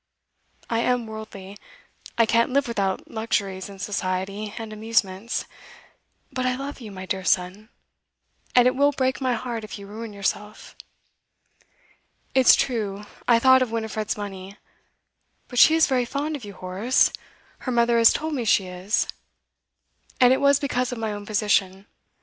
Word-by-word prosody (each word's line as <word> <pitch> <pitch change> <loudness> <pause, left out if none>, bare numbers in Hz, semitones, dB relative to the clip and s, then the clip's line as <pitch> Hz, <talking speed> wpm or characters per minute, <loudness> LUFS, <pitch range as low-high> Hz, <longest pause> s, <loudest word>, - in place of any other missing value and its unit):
I 230 - 0
am 245 0 +1
worldly; 215 -2 -9 0.6
I 230 - +5
can't 230 +2 +2
live 275 +1 +1
without 195 -5 -2
luxuries 200 -4 -2
and 195 -1 -11
society 195 +1 -3
and 225 -2 -6
amusements; 215 -1 -1 0.9
but 255 -1 -2
I 255 0 +1
love 275 +1 -6
you, 215 -3 -8
my 190 -1 -8
dear 190 0 -3
son, 185 +4 0 0.9
and 245 0 +6
it 255 - +2
will 285 +2 +3
break 260 0 -1
my 255 -1 +1
heart 235 -1 -4
if 215 - -7
you 200 - -10
ruin 220 +2 -8
yourself. 205 +1 -4 1.6
It's 260 -2 +7
true 210 -5 -2 0.2
I 235 - +6
thought 260 +2 +6
of 255 - +1
Winifred's 220 -2 -3
money, 195 -1 -7 0.9
but 245 - -2
she 320 - +8
is 325 - +5
very 255 -3 +1
fond 290 +5 -3
of 280 - -8
you, 205 -1 -8
Horace; 190 +8 +1 0.5
her 255 - -4
mother 235 -1 +3
has 230 - +7
told 315 +1 -2
me 260 -4 -1
she 200 -3 +3
is. 185 +3 -1 1.1
And 250 0 +6
it 265 - 0
was 280 0 +4
because 255 -2 -1
of 245 - -4
my 220 -2 -2
own 205 0 -8
position. 200 -2 +1
220 Hz, 160 wpm, -24 LUFS, 200-250 Hz, 1.6 s, she